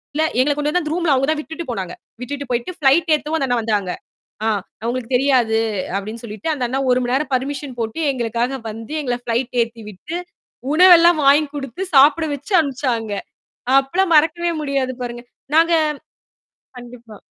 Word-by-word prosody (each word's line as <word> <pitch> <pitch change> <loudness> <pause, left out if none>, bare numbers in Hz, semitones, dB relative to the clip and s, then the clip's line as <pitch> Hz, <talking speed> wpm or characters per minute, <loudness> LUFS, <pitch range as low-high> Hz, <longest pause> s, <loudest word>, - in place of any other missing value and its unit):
இல்ல. 310 - +2 0.2
எங்களக் 285 +3 +2
கொண்டுவந்து 300 +4 0
அந்த 305 0 -3
ரூம்ல 345 -4 +2
அவுங்க 265 +1 +1
தான் 310 - -1
விட்டுட்டு 320 +2 -7
போனாங்க. 190 -6 -4 0.3
விட்டுட்டு 285 +1 -6
போயிட்டு 240 +8 -2
ஃபிளைட் 310 +3 +3
ஏத்தவும் 305 +1 -2
அந்த 270 - 0
அண்ணா 245 -1 +1
வந்தாங்க. 210 -4 -1 0.5
ஆ, - - +2 0.4
அவுங்களுக்கு 240 +1 -3
தெரியாது 245 -4 +2 0.4
அப்பிடின்னு 215 +4 -6
சொல்லிட்டு 215 +8 -4
அந்த 265 -4 -2
அண்ணா 265 +3 -2
ஒரு 250 - +3
மணி 245 0 -1
நேரம் 275 0 -2
பர்மிசன் 270 0 -4
போட்டு 225 +7 -4
எங்களுக்காக 240 +2 -2
வந்து 225 +6 -8
எங்கள 245 -4 -2
ஃப்ளைட் 240 +2 -2
ஏத்தி 230 -1 -11
விட்டு 290 - -8 0.6
உணவெல்லாம் 345 0 +7
வாங்கி 290 +2 +5
கொடுத்து, 275 +3 -5
சாப்பிட 290 +4 +6
வச்சு 285 +8 -9
அனுப்பிச்சாங்க. 255 -7 -1 0.7
அப்பலாம் 340 +6 0
மறக்கவே 335 +3 +3
முடியாது 275 -3 -1
பாருங்க. 240 -1 -5 0.3
நாங்க 330 +1 +4 1.1
கண்டிப்பா. 240 -3 -12
270 Hz, 160 wpm, -20 LUFS, 235-305 Hz, 1.1 s, உணவெல்லாம்